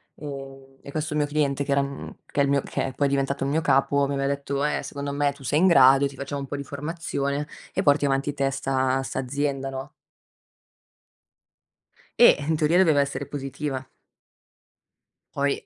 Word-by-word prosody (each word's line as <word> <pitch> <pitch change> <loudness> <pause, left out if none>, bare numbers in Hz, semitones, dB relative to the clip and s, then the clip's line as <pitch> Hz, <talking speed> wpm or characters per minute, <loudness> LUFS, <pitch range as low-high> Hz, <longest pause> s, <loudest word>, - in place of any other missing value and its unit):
Ehm, 135 -2 -9
e 140 - -10
questo 155 +1 -3
mio 150 -1 +2
cliente 145 -1 0
che 140 - -4
era 140 - +3
mhmm, 140 0 -7
che - - -4
è - - +5
il 140 - +1
mio 140 -1 +2
che 130 - -3
poi 145 - +1
è - - -1
diventato 140 0 0
il 135 - 0
mio 160 +2 +1
capo 140 0 +2
mi 140 - -2
aveva 135 0 0
detto: 140 0 -2
"Eh 150 - 0
secondo 140 0 -5
me 145 0 +1
tu - - -15
sei 145 +4 +1
in 185 - +5
grado, 135 -4 +6
ti 140 - -11
facciamo 140 +1 -5
un 140 - -6
po' 145 - -4
di 140 - -4
formazione 145 -1 -3 0.3
e - - 0
porti 145 0 +4
avanti 140 +1 0
te 135 -1 0
sta 135 -1 0
sta 130 - -4
azienda." 135 +1 -2
No? 135 +1 -6 2.3
Eh, 240 - +8
in 160 - +2
teoria 155 +3 +2
doveva 160 -6 +5
essere 140 0 -3
positiva. 135 -1 -5 1.5
Poi, 140 0 0
140 Hz, 190 wpm, -25 LUFS, 135-145 Hz, 2.3 s, Eh